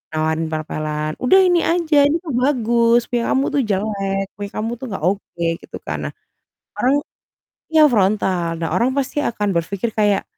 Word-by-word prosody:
nawarin 160 +1 0
pel-pelan, 155 -1 -3
“Udah 315 +10 +5
ini 355 -2 +3
aja, 315 -4 +3
ini 300 +3 +1
kan 310 -6 -5
bagus 240 -2 +2
punya 240 -1 0
kamu 270 +1 +2
tuh 285 - +3
jelek, 195 -1 -1 0.2
punya 205 0 -4
kamu 225 +2 -2
tuh 265 - -6
nggak 190 -5 -5
oke,” 180 -2 -2 0.2
gitu - - -9
kan. - - -4
Nah, - - -13 0.7
orang 260 +3 +3 0.7
ya 315 -1 +5
frontal. 190 -5 +1
Nah 165 0 -3
orang 240 +2 +2
pasti 280 +1 -1
akan 210 -7 -1
berpikir 190 +6 -2
kayak, 205 -2 +1
215 Hz, 170 wpm, -20 LUFS, 180-260 Hz, 0.7 s, Udah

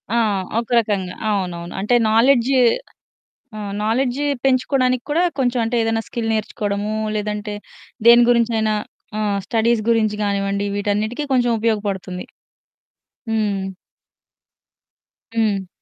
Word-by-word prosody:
ఆ! - - +3 0.4
ఒక 235 - -5
రకంగా 200 -5 -2
అవునవును. 180 -4 -2
అంటే 215 +5 +2 0.2
నాలెడ్జ్ 240 +2 +4 1.1
ఆహ్, 205 -2 -5
నాలెడ్జ్ 250 +4 0 0.2
పెంచుకోవడానికి 255 -1 +2
కూడా 325 +4 +2 0.2
కొంచెం 245 -2 +1
అంటే 235 +2 -1
ఏదైనా 225 0 0
స్కిల్ 230 -2 -3
నేర్చుకోవడము, 210 -1 -2 0.2
లేదంటే 210 0 -3 0.5
దేని 240 +1 +8
గురించైనా 225 -2 +2 0.4
ఆ! - - -1 0.3
స్టడీస్ 230 0 +1
గురించి 220 -2 +2
గానివ్వండి 200 0 -1
వీటన్నిటికీ 210 +6 -1
కొంచెం 245 -2 +3
ఉపయోగపడుతుంది. 200 -5 -2 1.1
హ్మ్. 210 -3 0 1.7
హ్మ్. 205 -4 +1
220 Hz, 100 wpm, -20 LUFS, 205-240 Hz, 1.7 s, దేని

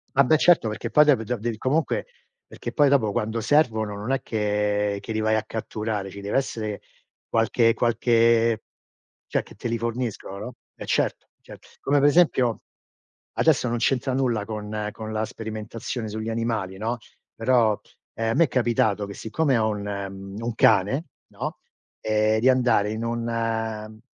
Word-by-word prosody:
Ah 140 0 +6
beh, 155 +5 +4
certo. 165 -7 +4
Perché 110 +2 -4
poi 150 +4 +6
dopo 135 -6 +4
do 120 +3 -2
devi 115 0 -3
comunque 145 +7 0 0.4
perché - - -7
poi 145 -2 +4
dopo, 115 -7 +2
quando 115 -1 -1
servono 110 -5 +2
non 105 +5 -4
è 135 - +1
che 105 -1 0
che 105 - -7
li 110 - -1
vai 110 0 +2
a 110 - -1
catturare, 110 -3 -4
ci 100 - -9
deve 100 +4 -1
essere 110 -6 -2 0.5
qualche 115 +1 +3
qualche 115 -1 +3 0.6
cioè, - - 0
che - - -15
te 120 +4 -4
li 115 - 0
forniscano, 115 -4 -4
no 115 +4 -6 0.2
e - - -8
certo, - - 0
cer - - -12 0.2
come 145 +1 +2
per 145 +1 +5
esempio 135 -8 +3 0.8
adesso 125 - +3
non 120 - 0
c'entra 130 +2 +1
nulla 125 -5 +1
con 105 0 -4
con 110 0 -6
la 110 - 0
sperimentazione 110 +1 -5
sugli 110 +1 -4
animali, 110 -5 -2
no, 115 +3 -2 0.4
però, 115 -3 +2 0.4
ehm, 115 0 -1
a - - -1
me 170 - +5
è - - -5
capitato 115 -5 +1
che 100 - -8
siccome 135 +5 0
ho 110 -1 +2
un 105 -1 -3
mhmm, 100 0 -6
ho 115 - -4
un 120 - -3
cane, 110 - +3 0.2
no, - - -5 0.4
ehm, 110 0 +2
di 130 - +5
andare 120 -5 +3
in 110 +1 -4
un 115 -2 -3
115 Hz, 175 wpm, -24 LUFS, 105-120 Hz, 0.8 s, Ah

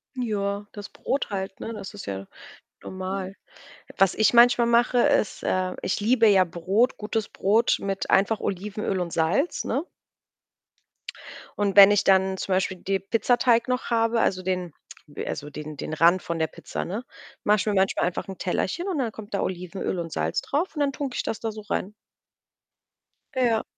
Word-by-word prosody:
Joa, 205 -4 -2
das 205 -1 -9
Brot 275 - -3
halt, 190 -1 -4
ne, 230 - -5
das 200 -2 -8
ist 205 - -9
ja 95 0 -5 0.6
normal. 190 0 -5 0.6
Was 195 -1 +4
ich 220 +1 +3
manchmal 240 0 +6
mache, 240 +1 +3
ist 215 - +2
äh, 185 0 0
ich - - -1
liebe 225 +2 +4
ja 195 -3 +6
Brot, 185 +8 0
gutes 215 0 -3
Brot 220 +4 +2
mit 195 -1 -3
einfach 205 +3 +3
Olivenöl 200 0 -3
und 175 -2 -3
Salz, 170 - +1
ne? 275 +8 -2 1.7
Und 200 -2 +1
wenn 200 -1 +10
ich 205 -1 +3
dann 190 0 +3
zum 190 - -2
Beispiel 185 0 0
die 195 +2 -1
Pizzateig 230 +4 +2
noch 250 0 -1
habe, 230 0 +2
also 185 -1 0
den 180 -3 -2 0.5
also 145 0 -5
den 150 +1 -8
den 150 - -6
Rand 170 +3 +4
von 170 - -4
der 160 - +1
Pizza, - - -6
ne, 210 +7 -4 0.4
mache 210 +1 +4
ich 205 - -2
mir 210 - 0
manchmal 190 0 +2
einfach 175 +4 -3
'n 190 -1 -7
Tellerchen 195 - -2
und 360 -7 -1
dann 240 -4 -1
kommt 215 -1 -11
da 200 - 0
Olivenöl 180 +1 -3
und 165 -1 -5
Salz 80 - -1
drauf 320 +4 -2
und 295 - -2
dann 285 -1 +2
tunke 270 -2 -5
ich - - -1
das 225 - -3
da 225 - -3
so 215 0 -9
rein. 205 -1 -3 1.4
Ja. 240 -4 +2
200 Hz, 180 wpm, -25 LUFS, 185-230 Hz, 1.7 s, wenn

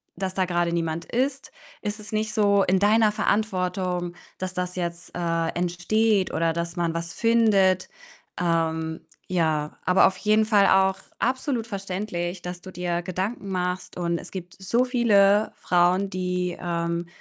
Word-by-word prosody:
dass 185 +1 -3
da 190 -1 +2
grade 175 -1 0
niemand 165 -1 -2
ist, 265 +3 -2 0.3
ist 210 0 -3
es 215 - -9
nicht 215 0 -1
so 200 -2 +4
in 190 +1 +2
deiner 215 +1 +4
Verantwortung, 185 -4 -1 0.2
dass 185 0 -4
das 180 0 -3
jetzt, 170 -1 -4
äh, 165 -1 0
entsteht 185 +4 +1
oder 165 0 +1
dass 170 +1 -3
man 170 -1 0
was 170 0 -4
findet. 210 -5 +3 0.5
Ähm, 160 -2 -1 0.2
ja, 155 -4 0
aber 180 +1 +5
auf 190 - -3
jeden 215 +2 +3
Fall 205 -2 +4
auch 190 0 +3 0.2
absolut 255 -1 0
verständlich, 190 -3 -4
dass 180 0 -6
du 190 - -10
dir 175 -1 -2
Gedanken 190 +4 -3
machst 180 -1 -3
und 170 -1 -1
es - - -9
gibt 180 -2 -8
so 235 +7 +2
viele, 210 -4 +4
äh, - - -19
Frauen, 180 +2 +2
die, 180 -1 -2
ähm, 170 0 -2
185 Hz, 155 wpm, -25 LUFS, 175-205 Hz, 0.5 s, aber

